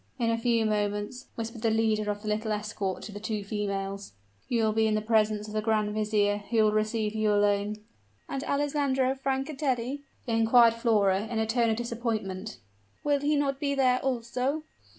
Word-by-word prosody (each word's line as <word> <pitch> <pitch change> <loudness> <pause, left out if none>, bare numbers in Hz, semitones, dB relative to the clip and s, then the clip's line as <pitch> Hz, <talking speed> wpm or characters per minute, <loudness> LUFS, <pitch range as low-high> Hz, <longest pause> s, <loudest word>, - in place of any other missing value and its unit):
"In 230 -3 +1
a 230 - +1
few 230 -1 +2
moments," 210 +3 -2
whispered 230 0 -5
the 225 - +2
leader 220 -1 +1
of 205 +1 -3
the - - -6
little 215 +1 -1
escort 210 -2 -3
to - - -7
the 205 - -7
two 215 -1 -3
females, 200 - -3 0.4
"you 230 -2 +2
will 215 -1 +2
be 220 0 +3
in 215 - +1
the - - +2
presence 215 -1 +1
of 210 - -8
the 215 - 0
grand 215 -1 +1
vizier, 210 -1 +1
who 225 -2 +3
will 215 - +4
receive 215 0 0
you 215 -1 +1
alone." 205 0 +2 0.5
"And 275 0 -4
Alessandro 280 -2 +1
Francatelli?" 270 -1 -2 0.2
inquired 230 0 +5
Flora, 210 -3 +2
in 230 0 -3
a 220 - +1
tone 230 +1 +2
of 220 - +2
disappointment, 220 -4 -3 0.5
"will 290 -1 +2
he 295 +2 +1
not 275 -2 0
be 280 -1 0
there 255 -2 +3
also?" 255 +3 -1
220 Hz, 185 wpm, -28 LUFS, 210-250 Hz, 0.5 s, inquired